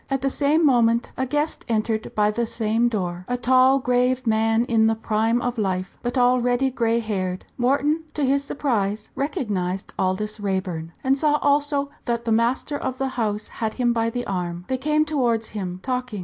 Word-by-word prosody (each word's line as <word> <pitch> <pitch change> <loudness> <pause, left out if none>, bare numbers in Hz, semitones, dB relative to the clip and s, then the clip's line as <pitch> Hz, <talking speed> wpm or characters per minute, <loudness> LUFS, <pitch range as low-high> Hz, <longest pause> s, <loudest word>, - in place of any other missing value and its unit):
At 270 -1 -1
the 275 - +1
same 300 +4 +2
moment 235 -3 +3
a 260 - -2
guest 295 +3 -1
entered 220 -1 -1
by 210 0 +3
the 235 +2 -1
same 225 +1 +1
door, 180 -6 -3
a 245 - -1
tall 255 +2 +4
grave 250 0 +1
man 225 +1 +2
in 225 -2 +3
the 225 - +2
prime 225 +1 +1
of 245 -1 -2
life, 185 -2 -2
but 240 +2 -2
already 250 +1 +3
grey 230 -2 +1
haired. 190 -5 -3
Wharton, 290 +5 +1
to 295 - +1
his 275 +1 +2
surprise, 220 -8 -2
recognised 200 -10 -2
Aldous 210 +4 -1
Raeburn, 185 -5 -3
and 265 +1 +3
saw 300 0 +3
also 285 0 +1
that 235 0 -2
the 230 - 0
master 240 +6 +1
of 260 -1 -3
the 270 0 -1
house 215 -4 -2
had 220 -1 -1
him 240 -2 +1
by 230 0 +1
the 245 +1 -4
arm. 180 -2 -3
They 260 -1 -1
came 305 +3 +2
towards 240 -7 0
him, 185 -4 -5
talking. 250 -4 -3
235 Hz, 185 wpm, -23 LUFS, 215-260 Hz, -, tall